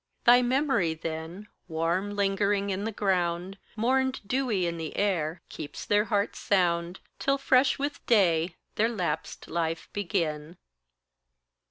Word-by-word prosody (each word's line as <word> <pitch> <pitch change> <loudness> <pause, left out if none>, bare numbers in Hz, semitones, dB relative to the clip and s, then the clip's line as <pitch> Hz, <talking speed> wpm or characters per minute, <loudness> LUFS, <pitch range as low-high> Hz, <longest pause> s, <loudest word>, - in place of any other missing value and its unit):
Thy 245 +1 +7
memory 250 - +1
then, 165 +5 -6 0.2
warm 175 +5 -1
lingering 200 0 +1
in 195 +2 -2
the 225 - -1
ground, 185 -1 -1 0.2
Mourned 260 +4 +1
dewy 240 -6 0
in 170 0 -2
the 160 -2 -5
air, 170 -5 0
keeps 150 -2 -7
their 210 +1 +3
hearts 205 -2 -1
sound, 175 -2 +1 0.2
Till 275 0 +2
fresh 265 -1 +3
with 285 +1 -3
day 175 -6 +3 0.2
their 225 +2 +3
lapsed 175 -8 -3
life 165 -1 -2
begin. 170 -4 -2
195 Hz, 130 wpm, -28 LUFS, 170-215 Hz, 0.2 s, Thy